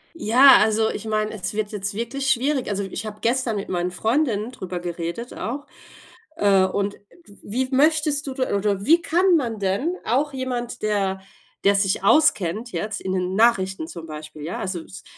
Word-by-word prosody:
Ja, 270 -1 +7
also 220 +1 +2
ich 215 - -6
meine, 215 0 -1
es 190 -2 -4
wird 215 0 -2
jetzt 200 -1 -3
wirklich 255 +5 -2
schwierig. 265 +1 +1
Also 200 -1 -1
ich 200 +3 -5
habe 210 0 -7
gestern 235 -2 0
mit 200 - -4
meinen 180 0 -1
Freundinnen 225 +2 0
drüber 185 -7 -6
geredet 175 +6 -5
auch. 280 +6 -5 0.7
Äh, 200 -8 +4
und 200 +2 -2
w - - -23 0.4
wie 255 +5 -2
möchtest 295 +1 +2
du 270 - -4
da 260 -5 -1
oder 200 -1 -1
wie 330 +4 +5
kann 350 +2 +3
man 230 -6 -3
denn 200 - 0
auch 275 +5 0
jemand, 245 -2 -4
der 195 -3 0 0.4
der 200 0 +4
sich 195 -1 +1
auskennt 220 - +2
jetzt 210 -2 -3
in 190 - -3
den 185 0 -1
Nachrichten 190 -7 +2
zum 165 0 -9
Beispiel, 155 0 -9
ja, 165 - -4
also 185 -3 -4
s 190 - -12
215 Hz, 180 wpm, -23 LUFS, 190-260 Hz, 0.7 s, Ja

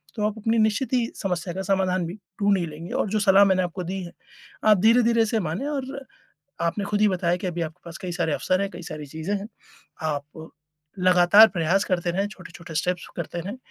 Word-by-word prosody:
तो 210 -2 -1
आप 215 +1 -5
अपनी 225 +2 +1
निश्चित 220 +5 +1
ही 245 -2 +3
समस्या 180 -2 -3
का 190 - -3
समाधान 185 -2 +1
भी 170 - -6 0.3
ढूँढ 200 -1 +4
ही 175 - -1
लेंगे। 160 +3 -9
और - - 0
जो 215 +2 0
सलाह 195 +1 +7
मैंने 190 -1 +3
आपको 180 +1 -4
दी 190 +2 -4
है, 170 - -8 0.5
आप 215 -1 +6
धीरे-धीरे 230 +2 +4
इसे 225 0 0
मानें 245 - -3
और 275 -1 -4 0.6
आपने 200 +4 -3
ख़ुद 205 0 -1
ही 210 - +5
बताया 175 -2 +1
कि 185 - -5
अभी 175 -1 -3
आपके 160 +2 -6
पास 170 0 -8
कई 185 -2 -5
सारे 170 -3 -1
अवसर 185 +5 0
हैं, 195 - -2
कई 175 -1 -9
सारी 155 -3 -7
चीज़ें 160 +7 -4
हैं। 200 +2 -6 0.5
आप 155 +1 -4 0.5
लगातार 180 +4 +7
प्रयास 180 +3 +1
करते 175 -2 0
रहें, 195 +4 0
छोटे-छोटे 170 -4 -11
स्टेप्स 175 +3 -1
करते 170 0 -4
रहें। 200 +8 -6
185 Hz, 215 wpm, -24 LUFS, 170-210 Hz, 0.6 s, सलाह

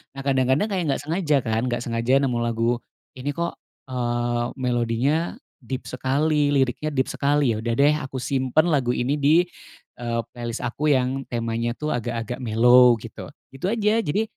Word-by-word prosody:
Nah, 135 - -5
kadang-kadang 135 - +2
kayak 185 -2 0
nggak - - -5
sengaja, 155 -2 +1
kan? 110 +2 -1
Nggak 120 -1 -2
sengaja 120 +4 +1
nemu 125 -3 0
lagu, 120 +1 0 0.3
"Ini 140 +2 -5
kok, 170 0 -1 0.4
eee, 120 -1 -1
melodinya 125 +5 0 0.2
deep 130 +1 -5
sekali, 145 +4 +1
liriknya 135 +3 +1
deep 130 -3 -1
sekali." 140 -3 +2
Ya 110 - -2
udah 115 +1 -2
deh, 145 +4 +4
aku 135 -1 -8
simpen 130 +5 +1
lagu 125 -4 +1
ini 140 +5 0
di, 155 +5 +5 0.6
eee, 115 -1 -1
playlist 120 -1 -5
aku 130 +5 -2
yang 130 +1 -1
temanya 115 0 -2
tuh, 150 +2 -3
agak-agak 120 0 -3
mellow, 120 +1 +6
gitu. 115 0 -9 0.2
Itu 135 +7 -4
aja, 215 0 +2
jadi, 205 +2 0
130 Hz, 165 wpm, -23 LUFS, 120-145 Hz, 0.6 s, mellow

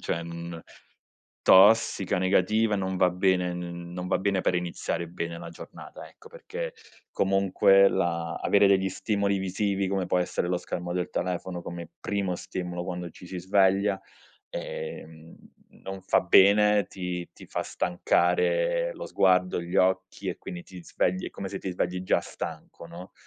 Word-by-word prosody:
cioè, 85 - -2
mhmm, 85 0 -7 0.8
tossica, 100 -1 +5
negativa, 105 +3 +2
non 95 -1 -2
va 90 -1 +4
bene, 90 -1 +1
n 85 0 -7
non 90 0 -5
va - - +1
bene 95 -1 0
per 90 - +1
iniziare 85 -1 -3
bene 85 -1 -5
la - - -8
giornata - - -11
ecco, 450 - -17
perché - - -6 0.4
comunque 95 0 +4
la 85 -1 -1
avere 100 -1 +4
degli 95 -1 +3
stimoli 100 0 -1
visivi, 95 0 -1
come 95 -2 -1
può 90 - +1
essere 90 0 -1
lo 90 - +1
schermo 90 0 -5
del 90 -1 -2
telefono, 90 0 -3
come 85 -1 -7
primo 100 -3 -2
stimolo 90 -1 -5
quando 90 -2 -5
ci 90 - -13
si 90 0 -6
sveglia 95 +1 +2 0.5
ehm, 485 - -7 0.5
non 95 0 -6
fa 95 - +3
bene, 100 +2 +5
ti 90 -1 -5
ti - - -14
fa - - -3
stancare - - +1
lo - - -7
sguardo, 90 -1 +2
gli 85 +1 -7
occhi 95 0 +1
e - - -4
quindi 90 -1 -7
ti 90 -1 -12
svegli 95 +1 -1
è - - -6
come 100 -1 -6
se 95 - -5
ti 95 - -4
svegli 90 +1 -2
già 95 - +2
stanco, - - -8
no, 85 +2 -11
95 Hz, 160 wpm, -27 LUFS, 90-100 Hz, 0.8 s, tossica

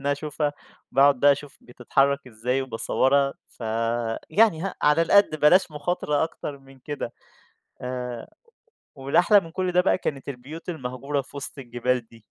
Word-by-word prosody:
أنا 145 - +3
أشوفها 150 0 -2 0.4
وباقعُد 140 -1 +5
بقى 145 0 +7
أشوف 145 0 -7
بتتحرّك 135 +3 0
إزاي 125 +3 -2
وباصوّرها، 135 +3 +1
ف - - -28 0.7
يعني 205 -6 +4
هق 195 - -4
على 150 +3 +4
القَد، 200 -1 +4
بلاش 175 +3 +5
مُخاطرة 150 -1 -1
أكتر 145 -3 -7
من 135 0 -18
كده 135 -3 -5 0.7
آآ، 125 -1 -5 0.7
والأحلى 175 +9 +4
من 165 - -11
كلّ 185 +1 -2
ده 180 - +4
بقى 185 - +2
كانت 140 -4 -4
البيوت 140 +7 -8
المهجورة 140 -2 -3
في 140 - -14
وِسط 140 +1 -7
الجبال 120 -1 -2
دي. 115 - -17
140 Hz, 150 wpm, -25 LUFS, 130-155 Hz, 0.7 s, بقى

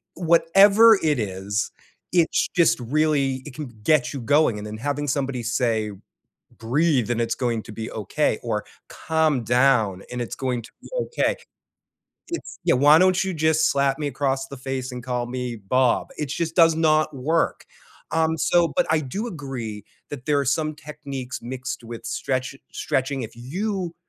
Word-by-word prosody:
Whatever 195 +6 +6
it 150 -4 +2
is, 100 0 -2 0.4
it's 170 -2 +2
just 170 -6 +4
really 135 0 +1
it 145 - -9
can 150 -2 -6
get 125 -1 +3
you 140 - -4
going. 145 -2 +3
And 105 - -7
then 105 0 -6
having 145 +4 -2
somebody 135 -2 -1
say, 115 -2 0 0.7
"Breathe 125 +2 +1
and 120 -1 0
it's 115 0 0
going 115 -3 -1
to - - -10
be 110 +1 -6
okay," 105 -4 -1
or - - -2 0.2
"Calm 160 -6 0
down 120 -6 +2
and 125 - -4
it's 120 0 -5
going 125 -2 -2
to 125 - -14
be - - -12
okay," 475 - 0 0.9
it's 340 - -6
"Yeah, 170 - +4
why 145 +4 +6
don't 185 0 +4
you 190 - -2
just 160 0 +2
slap 140 -1 +1
me 150 - -2
across 135 -1 -1
the 140 - -8
face 130 0 -4
and 125 0 -6
call 125 -1 -2
me 125 -1 -4
Bob?" 120 +5 +1
It 150 - -2
just 165 +3 -2
does 165 -2 +6
not 155 -1 +2
work. 160 +6 0 0.5
Um, 160 0 +1
so, 170 0 +3
but - - +3
I 160 - +3
do 190 - -4
agree 130 - -6 0.3
that 135 -3 -8
there 150 -2 +3
are 140 - 0
some 155 +3 0
techniques 140 -4 -7
mixed 125 +1 -5
with 115 0 -8
stretchi 130 +3 -3
stretching. 135 0 -1
If 110 - -7
you 180 - -3
135 Hz, 170 wpm, -23 LUFS, 120-155 Hz, 0.9 s, Whatever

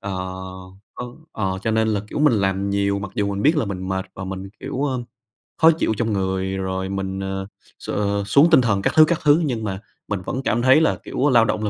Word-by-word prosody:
ờ, 100 -1 -5 0.8
ơ, 125 - -6 0.3
ờ, 95 -3 -2
cho 110 - 0
nên 110 0 +2
là, 105 -2 0
kiểu, - - -4
mình 150 -4 +4
làm 100 0 0
nhiều 100 0 +1
mặc 100 -1 -6
dù 100 -1 0
mình 100 - -3
biết 155 +3 +4
là 145 - +1
mình 95 -2 -5
mệt 95 0 -2
và 95 - -6
mình, 95 +1 -6
kiểu, 135 +1 -3
ưm, 130 -3 -2 0.5
khó 165 0 +7
chịu 155 -8 0
trong 110 -2 0
người 95 0 -1
rồi 95 0 -3
mình, 95 0 -3
ờ, 95 0 -4 0.3
x - - -10 0.4
xuống 140 +10 +5
tinh 145 - +7
thần 100 -5 +1
các - - 0
thứ 155 0 +8
các 170 0 0
thứ. 150 +3 +5
Nhưng 120 -5 -2
mà 95 -2 -3 0.3
mình 100 -3 -2
vẫn 130 - -3
cảm 120 -2 +1
thấy 130 +5 +5
là 160 - +2
kiểu 145 +3 0
lao 120 -3 +5
động 110 -1 -1
là 105 - 0
100 Hz, 240 wpm, -22 LUFS, 95-130 Hz, 0.8 s, thứ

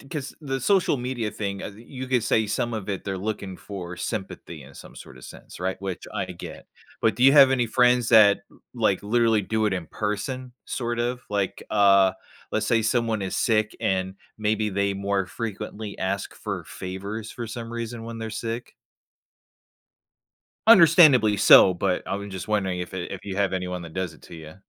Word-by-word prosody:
'c - - -16
'cause 145 -4 -5
the 135 -3 -3
social 190 +1 +2
media 120 -3 -3
thing, 100 -2 -4
uh, - - -5
the 105 +3 -15
you 130 +1 -8
could 125 -2 +1
say 110 -1 +1
some 120 +3 -2
of 105 -2 -5
it, 100 -2 -3
they're 95 -2 -3
looking 100 -2 -4
for 90 -4 -8
sympathy 90 -7 -6
in 70 +1 -15
some - - -13
sorta 65 - -13
sense, - - -12
right? 95 +1 -3
Which 95 -2 -5
I - - -2
get, - - -9 0.3
but 110 - +2
do 125 - +2
you 135 - +8
have 140 -2 +8
any 125 -3 +1
friends 125 0 +3
that, 105 -3 +6
m - - -22
like, - - +1
literally 115 0 +2
do 110 +2 0
it 105 - 0
in 90 -4 -3
person, 125 +5 -4
sort 120 -1 -3
of? 120 +1 -2
Like, 100 -2 -2
uh, 100 -2 +5 0.4
let's 110 0 0
say 115 0 +3
someone 115 -2 0
is 95 - -3
sick 110 -2 +1
and 95 0 -1 0.2
maybe 110 0 0
they 100 0 0
more 100 -1 -1
frequently 105 +1 -6
ask 95 - -3
for - - -5
favors 100 +4 -6
for 120 - -6
some 115 +1 -7
reason 115 -1 -5
when 115 0 -7
they're 110 0 -5
sick? 115 +2 -5 1.9
Understandably 155 - +7
so, 95 - +8
but 90 +1 -1
I - - -2
was 100 0 -7
just 95 +2 -7
wondering 95 -4 0
if 90 - -6
it 95 -2 -5
if - - -6
you 100 -1 -5
have 100 -2 +1
anyone 90 -1 -3
that 80 -1 -10
does 95 -1 -3
it - - -19
to - - -12
ya? 80 -1 -10
105 Hz, 195 wpm, -25 LUFS, 95-120 Hz, 1.9 s, you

